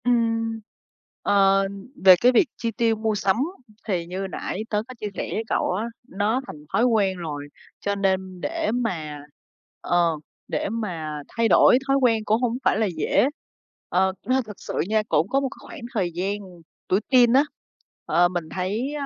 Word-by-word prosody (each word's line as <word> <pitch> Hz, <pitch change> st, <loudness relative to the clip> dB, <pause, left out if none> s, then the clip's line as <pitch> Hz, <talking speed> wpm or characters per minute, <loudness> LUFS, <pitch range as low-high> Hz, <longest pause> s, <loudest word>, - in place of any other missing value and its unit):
Ừm, 225 Hz, -2 st, +1 dB, 0.6 s
ờ, 195 Hz, -1 st, +4 dB, 0.4 s
về 185 Hz, -1 st, +11 dB
cái 250 Hz, -, +6 dB
việc 255 Hz, +6 st, +4 dB
chi 230 Hz, -1 st, -2 dB
tiêu 230 Hz, 0 st, +1 dB
mua 220 Hz, 0 st, -1 dB
sắm 195 Hz, -1 st, +2 dB, 0.5 s
thì 180 Hz, -5 st, -1 dB
như 185 Hz, +3 st, -4 dB
nãy 195 Hz, +2 st, -4 dB
tớ 210 Hz, 0 st, 0 dB
có 255 Hz, -, -8 dB
chia 210 Hz, -, -3 dB
sẻ -, -, -3 dB
với 220 Hz, -, -1 dB
cậu -, -, 0 dB
á, 210 Hz, +5 st, -1 dB, 0.2 s
nó 215 Hz, +4 st, 0 dB
thành 150 Hz, 0 st, -10 dB
thói 230 Hz, -, +3 dB
quen 205 Hz, -6 st, +2 dB
rồi, 150 Hz, -4 st, -5 dB, 0.3 s
cho 200 Hz, 0 st, -1 dB
nên 190 Hz, -2 st, -1 dB
để 325 Hz, -2 st, -1 dB
mà 165 Hz, -12 st, -2 dB, 0.6 s
ờ, 170 Hz, -2 st, +2 dB, 0.3 s
để -, -, -2 dB
mà 165 Hz, -9 st, -4 dB
thay 230 Hz, 0 st, 0 dB
đổi 245 Hz, -, +6 dB
thói 275 Hz, 0 st, +3 dB
quen 225 Hz, -4 st, +3 dB
cũng 220 Hz, +3 st, +2 dB
hổng 245 Hz, -1 st, 0 dB
phải -, -, +3 dB
là 220 Hz, -, +2 dB
dễ, 155 Hz, -, +3 dB, 0.6 s
ờ. 190 Hz, +1 st, +2 dB
Ơ, 260 Hz, +1 st, +2 dB
thực 210 Hz, -1 st, -9 dB
sự -, -, -7 dB, 0.2 s
nha, 215 Hz, 0 st, +2 dB
cũng 165 Hz, -, +2 dB
có 275 Hz, -, +2 dB
một 275 Hz, -1 st, -1 dB
cái -, -, -13 dB
khoảng -, -, -9 dB
thời 190 Hz, -6 st, 0 dB
gian 195 Hz, +4 st, -1 dB, 0.5 s
tuổi 190 Hz, -, +3 dB
teen 245 Hz, -2 st, +6 dB
á, 270 Hz, +2 st, +6 dB, 0.6 s
ờ, 175 Hz, +1 st, +4 dB
mình 175 Hz, -3 st, -4 dB
thấy, 210 Hz, +10 st, -2 dB
ơ, 290 Hz, -2 st, -3 dB
210 Hz, 185 wpm, -24 LUFS, 185-235 Hz, 0.6 s, về